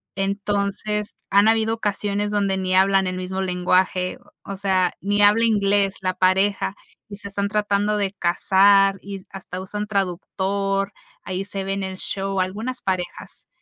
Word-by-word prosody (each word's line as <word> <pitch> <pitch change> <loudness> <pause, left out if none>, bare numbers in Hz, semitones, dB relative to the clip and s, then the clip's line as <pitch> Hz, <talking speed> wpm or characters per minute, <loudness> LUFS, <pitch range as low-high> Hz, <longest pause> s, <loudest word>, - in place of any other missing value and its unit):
Entonces 200 +1 -2
han 200 +2 +5
habido 225 0 +3
ocasiones 205 -1 -2
donde 200 -2 +1
ni 185 -1 -1
hablan 195 0 +4
el 185 0 -3
mismo 185 +1 -3
lenguaje, 185 0 +1 0.3
o 195 - -6
sea, 190 -2 +1
ni 205 +2 +1
habla 210 +3 +5
inglés 200 -2 +2
la 185 -1 0
pareja 190 +1 +2 0.3
y 200 - -7
se 200 - -5
están 200 0 -2
tratando 210 0 +1
de 200 -1 -1
casar, 195 +2 +4
y 195 -1 -8
hasta 190 -1 -7
usan 210 +3 -5
traductor, 195 +1 -1 0.3
ahí 185 0 -3
se 195 -1 -4
ve 195 0 -2
en 195 0 -3
el 190 0 -5
show, 195 0 -3
algunas 220 +7 -3
parejas. 185 -2 -4
195 Hz, 155 wpm, -22 LUFS, 190-205 Hz, 0.3 s, han